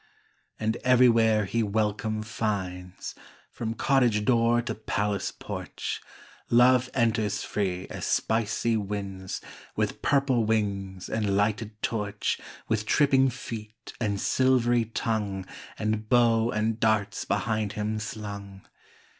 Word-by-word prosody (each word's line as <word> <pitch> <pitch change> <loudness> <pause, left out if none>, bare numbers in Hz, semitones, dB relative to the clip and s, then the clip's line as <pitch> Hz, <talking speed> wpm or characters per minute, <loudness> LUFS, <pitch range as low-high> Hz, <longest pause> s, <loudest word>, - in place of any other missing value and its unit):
And 110 +2 0
everywhere 115 -4 +4
he 115 +5 0
welcome 110 +1 0
finds, 95 -4 -3 0.4
From 115 -1 -4
cottage 120 -7 +2
door 120 0 +4
to 120 -1 -2
palace 105 -2 -1
porch - - -5 0.5
Love 125 +1 +5
enters 110 -4 +1
free 95 -3 -2
as - - -6
spicy 115 +1 +1
winds, 100 -2 -4 0.3
With - - -1
purple 135 -4 +2
wings 100 -4 -1
and 105 -3 0
lighted 105 +1 0
torch, 105 -3 -1 0.3
With 110 -1 -1
tripping 135 -2 +4
feet 110 -2 -8
and 100 -3 0
silvery 120 -2 +3
tongue, 105 -4 -2 0.3
And 110 0 -2
bow 115 -2 +4
and 110 0 0
darts 110 -3 +1
behind 110 -4 -1
him 105 0 -2
slung. 100 -2 -7
110 Hz, 115 wpm, -27 LUFS, 105-115 Hz, 0.5 s, Love